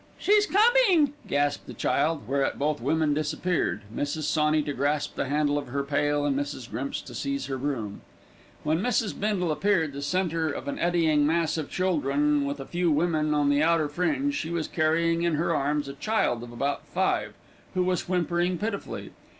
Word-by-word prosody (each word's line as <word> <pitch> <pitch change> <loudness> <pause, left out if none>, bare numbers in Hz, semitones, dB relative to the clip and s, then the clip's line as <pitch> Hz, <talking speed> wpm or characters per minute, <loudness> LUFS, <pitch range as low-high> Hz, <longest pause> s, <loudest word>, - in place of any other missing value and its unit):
"She's 415 0 +3
comin'," 405 - +4
gasped 145 0 0
the - - -8
child, 150 -5 0
whereat 135 +1 0
both 150 0 -1
women 150 +3 +1
disappeared, 155 - -1
Mrs. 145 +2 -2
Sawney 150 0 +2
to 145 - -3
grasp 145 +2 -1
the - - -2
handle 145 0 +1
of 140 - -8
her 140 +3 -2
pail, 145 +1 0
and 140 -2 +1
Mrs. 140 -3 -4
Grimps 140 +2 -3
to - - -11
seize 280 0 -2
her 135 - -3
broom. 120 -7 -3 0.6
When 155 +2 +1
Mrs. 230 -1 0
Bindle 195 -5 0
appeared, 165 -3 +1
the 140 - -6
centre 165 +1 0
of 145 - -5
an 140 - -3
eddying 160 -4 +2
mass 165 0 +1
of 155 -3 -3
children, 150 -5 +1
with 140 +1 -3
a 135 - -6
few 175 +2 0
women 155 -1 +1
on 145 -1 +2
the 145 +1 +3
outer 165 -1 +3
fringe, 275 - 0
she 165 - -3
was 170 -2 -2
carrying 165 +1 +1
in 170 -2 +1
her 165 +2 0
arms 145 0 0
a 140 - -6
child 140 - 0
of 120 0 -9
about 140 +4 -2
five, - - -1 0.4
who 185 - +2
was 180 -1 -1
whimpering 175 0 +1
pitifully. 210 +2 -4
155 Hz, 185 wpm, -27 LUFS, 145-175 Hz, 0.6 s, comin